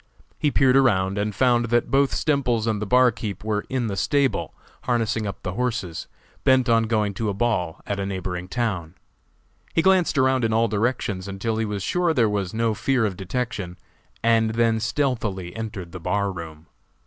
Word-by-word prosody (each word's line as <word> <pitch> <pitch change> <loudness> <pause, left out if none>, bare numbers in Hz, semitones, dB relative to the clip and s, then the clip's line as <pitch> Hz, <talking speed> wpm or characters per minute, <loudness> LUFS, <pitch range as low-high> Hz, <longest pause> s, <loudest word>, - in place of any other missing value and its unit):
He 150 - +2
peered 135 -2 +3
around 100 -7 +3
and 105 0 -2
found 120 -2 +3
that 120 +1 +1
both 135 0 +3
Stemples 125 -7 +1
and 110 -2 -1
the 105 - -3
barkeeper 120 -4 +2
were 105 -1 -1
in 130 -2 -1
the 100 -3 -2
stable 140 +6 +1 0.3
harnessing 115 -3 0
up 100 - -7
the 90 - -3
horses, 115 -7 -3 0.4
bent 130 -2 +4
on 115 -1 +3
going 105 -2 0
to 105 +2 -2
a 100 - -2
ball 100 -7 -1
at 100 -1 -3
a 100 - -2
neighboring 90 -2 -4
town. 95 -8 -2 0.8
He 165 - +3
glanced 185 -5 +3
around 130 -1 +3
in 110 -1 +1
all 115 +1 +3
directions 105 -3 -1
until 100 +3 -2
he 110 - 0
was 105 -2 -3
sure 175 - +1
there 115 -5 +4
was 100 -3 -1
no 115 0 0
fear 120 +3 +1
of 100 -3 -2
detection, 95 -2 -4 0.5
and 115 -1 +3
then 115 -1 +2
stealthily 110 -8 -2
entered 105 -6 -6
the 95 - -7
bar 100 +4 0
room. 80 -3 -9
110 Hz, 185 wpm, -24 LUFS, 100-125 Hz, 0.8 s, bent